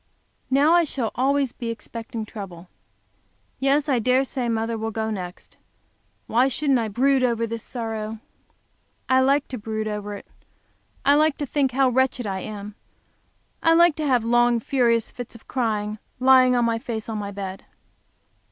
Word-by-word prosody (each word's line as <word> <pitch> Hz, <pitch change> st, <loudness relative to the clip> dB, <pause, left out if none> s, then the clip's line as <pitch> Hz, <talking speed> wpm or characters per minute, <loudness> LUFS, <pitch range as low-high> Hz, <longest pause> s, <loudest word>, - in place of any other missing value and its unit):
Now 285 Hz, +5 st, +4 dB
I 345 Hz, 0 st, +5 dB
shall 260 Hz, -7 st, -2 dB
always 270 Hz, 0 st, +1 dB
be 235 Hz, -2 st, -5 dB
expecting 230 Hz, -1 st, -6 dB
trouble. 185 Hz, -5 st, -9 dB, 0.9 s
Yes, 275 Hz, +2 st, +2 dB
I 265 Hz, -4 st, +2 dB
dare 255 Hz, +3 st, +3 dB
say 255 Hz, -2 st, -3 dB
mother 225 Hz, 0 st, -1 dB
will 220 Hz, 0 st, -3 dB
go 220 Hz, 0 st, -3 dB
next. 180 Hz, -4 st, -7 dB, 0.7 s
Why 245 Hz, +4 st, +3 dB
shouldn't 270 Hz, 0 st, +1 dB
I 225 Hz, -, -1 dB
brood 260 Hz, +5 st, +2 dB
over 230 Hz, -2 st, +1 dB
this 230 Hz, 0 st, -5 dB
sorrow? 225 Hz, -2 st, -5 dB, 0.9 s
I 260 Hz, 0 st, +4 dB
like 275 Hz, +2 st, +2 dB
to 255 Hz, -, -5 dB
brood 215 Hz, 0 st, -3 dB
over 210 Hz, -1 st, -4 dB
it; -, -, -10 dB, 0.8 s
I 285 Hz, -, +6 dB
like 305 Hz, 0 st, +3 dB
to 290 Hz, -, -2 dB
think 275 Hz, -2 st, 0 dB
how 270 Hz, 0 st, +3 dB
wretched 255 Hz, -1 st, +1 dB
I 190 Hz, -2 st, -2 dB
am; 210 Hz, +1 st, -7 dB, 0.9 s
I 330 Hz, 0 st, +4 dB
like 340 Hz, -2 st, +5 dB
to 305 Hz, -1 st, -1 dB
have 250 Hz, -4 st, +3 dB
long, 240 Hz, 0 st, +3 dB
furious 235 Hz, -2 st, +1 dB
fits 245 Hz, -1 st, -8 dB
of 230 Hz, -, -15 dB
crying, 215 Hz, -4 st, -2 dB, 0.2 s
lying 255 Hz, -1 st, +6 dB
on 240 Hz, -1 st, +2 dB
my 230 Hz, -1 st, 0 dB
face 225 Hz, -2 st, -5 dB
on 220 Hz, -2 st, -3 dB
the 200 Hz, -1 st, -5 dB
bed. 195 Hz, -1 st, -6 dB
235 Hz, 170 wpm, -23 LUFS, 220-265 Hz, 0.9 s, I